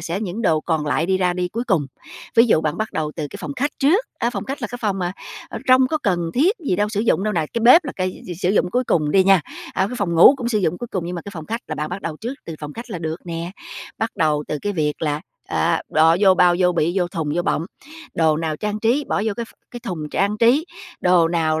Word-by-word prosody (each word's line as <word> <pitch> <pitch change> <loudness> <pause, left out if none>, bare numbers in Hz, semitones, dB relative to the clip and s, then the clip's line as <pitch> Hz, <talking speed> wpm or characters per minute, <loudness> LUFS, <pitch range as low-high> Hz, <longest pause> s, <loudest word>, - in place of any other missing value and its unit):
sẽ 170 +4 -3
những 210 +2 -4
đồ 160 -7 +2
còn 160 -2 -1
lại 155 +3 +1
đi 190 0 +1
ra 180 -1 +2
đi 180 0 -2
cuối 230 +6 -4
cùng. 185 - +1 0.5
Ví 230 +1 +6
dụ 215 - +4
bạn 155 0 -1
bắt 220 - -3
đầu 150 -1 -2
từ 155 -3 -3
cái - - -7
phòng 150 - -5
khách 285 +3 0
trước, 340 - +3
á, 235 - 0
phòng - - -4
khách 275 -1 -5
là 225 - -2
cái 245 - -7
phòng 205 -3 -1
mà, 180 -1 -2 0.4
ờ, - - -6
trong 255 0 +6
có 310 - 0
cần 175 - 0
thiết 345 - +3
gì 280 - -1
đâu, 210 +2 +1
sử 210 -1 -2
dụng 215 -3 +1
đâu 215 - 0
nè, 155 - 0
cái 235 - -1
bếp 255 +9 +7
là 280 - -4
cái 185 -1 -3
s 175 0 -7
sử 180 - +2
dụng 185 -3 +2
cuối 250 +6 +1
cùng 150 -9 +1
đi 190 +3 +4
nha, 195 -2 +5 0.3
à, 190 - +1
cái 250 +5 -6
phòng 195 -6 -1
ngủ 170 - +8
cũng 245 -3 -3
sử 220 -3 +1
dụng 175 -3 0
cuối 240 - -5
cùng 180 -3 -3
nhưng 180 - -4
mà 170 - -5
cái 200 - -8
phòng 160 -2 -7
khách 230 +2 -3
là - - -3
bạn 150 0 -3
bắt 180 +2 -6
đầu 160 -2 -4
trước 235 - -5
từ 165 - -6
phòng 150 -1 -6
khách 235 +5 -9
là 180 - -4
được 160 +1 -5
nè. 170 0 -4 0.5
Bắt 225 +1 -1
đầu 150 -2 +1
từ 150 - -2
cái 205 - -1
việc 150 -4 -2
là, 150 -1 0 0.3
à, 165 0 +1
bỏ 160 +1 +5
vô 195 -2 +6
bao, 180 -1 +5
vô 180 -1 +3
bị, 170 0 +1
vô 175 -1 0
thùng, 160 -4 -3
vô 175 - 0
bọng, 165 -1 -1 0.5
đồ 160 -2 +3
nào 160 -1 -2
trang 210 +3 -3
trí, 245 +7 +2
bỏ 200 - 0
vô 220 - +1
cái 235 - -3
ph - - -18 0.2
cái 240 - -8
thùng 160 -8 -5
trang 200 +2 0
trí, 245 +8 +4 0.4
đồ 180 -2 +4
nào 160 -2 +1
180 Hz, 290 wpm, -21 LUFS, 165-225 Hz, 0.5 s, ngủ